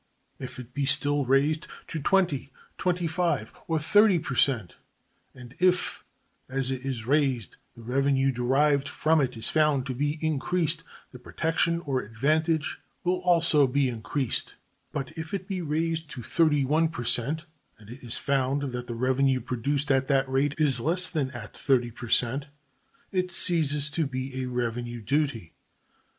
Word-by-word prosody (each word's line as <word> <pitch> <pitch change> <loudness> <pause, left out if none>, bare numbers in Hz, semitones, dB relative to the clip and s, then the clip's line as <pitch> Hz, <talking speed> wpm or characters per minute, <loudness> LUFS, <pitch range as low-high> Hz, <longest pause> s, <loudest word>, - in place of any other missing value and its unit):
If 130 -1 -7
it 125 -1 -10
be 140 -1 -1
still 145 +1 +3
raised 145 +5 +1 0.2
to 160 - -3
20, 155 -5 +1 0.3
25, 175 -1 -1
or 165 - 0
30 205 +5 +4
per 150 -4 -4
cent, 125 -8 +1 0.6
and 125 -1 -12
if 180 0 +1 0.5
as 135 0 +1
it 130 -1 -4
is 130 -5 -4
raised 130 - 0 0.2
the 115 - -13
revenue 135 +2 +1
derived 135 +3 +1
from 160 0 +2
it 125 -3 -2
is 110 - +2
found 150 -4 +2
to 130 - -3
be 145 +4 -1
increased, 160 +2 0 0.3
the 125 - -11
protection 165 +5 -1
or 135 -5 -1
advantage 155 +7 0 0.2
will 180 0 0
also 165 -5 +4
be 135 +1 +1
increased; 120 +2 -2 0.4
but 135 -1 -4
if 160 +4 -4
it 190 -1 -6
be 190 -3 -3
raised 160 0 -2
to 125 -5 -8
31 155 +2 +2
per 155 -6 -6
cent, 140 +7 +1 0.3
and 105 +1 -14
it 130 +3 -11
is 120 -1 0
found 140 0 0
that 125 0 -5
the 120 - -5
revenue 130 +2 +1
produced 135 +4 -2
at 135 0 +2
that 135 -1 +2
rate 135 +2 0
is 145 -5 +4
less 175 +8 +2
than 150 -6 -1
at 120 -4 -9
30 125 -4 +1
per 120 +1 -9
cent, 130 +6 +1 0.6
it 185 -2 -1
ceases 150 -5 +4
to 160 -2 0
be 130 0 -5
a - - -2
revenue 120 -1 -3
duty. 115 - -2
140 Hz, 160 wpm, -26 LUFS, 125-160 Hz, 0.6 s, 30